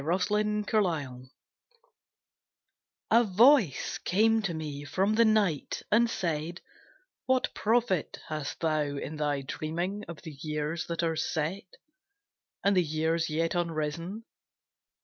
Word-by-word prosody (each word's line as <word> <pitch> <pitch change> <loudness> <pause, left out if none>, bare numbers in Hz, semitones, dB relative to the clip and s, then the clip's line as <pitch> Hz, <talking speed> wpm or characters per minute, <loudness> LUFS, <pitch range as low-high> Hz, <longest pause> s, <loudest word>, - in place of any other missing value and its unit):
A 170 +6 0
SONG 210 +2 +1
OF - - -8
DREAMS 145 - -1 1.8
A 230 +2 +6
voice 220 - +4
came 220 +4 +3
to 195 -4 -2
me 150 -3 -5
from 190 +8 0
the 230 +1 +5
night, 205 -9 +1
and 230 +2 +4
said, 165 -3 -2 0.7
What 260 0 +1
profit 225 -6 +1
hast 155 -3 -5
thou 155 -2 +1
in 145 +1 -4
thy 145 -2 0
dreaming 170 +8 -3
Of 170 -3 -9
the 160 - -7
years 150 +1 -3
that 170 0 -2
are 165 -1 +1
set 170 +5 -3 0.9
And 200 0 +3
the 180 - +5
years 160 +1 0
yet 165 +2 0
unrisen? 170 +4 -2
170 Hz, 130 wpm, -29 LUFS, 155-210 Hz, 1.8 s, A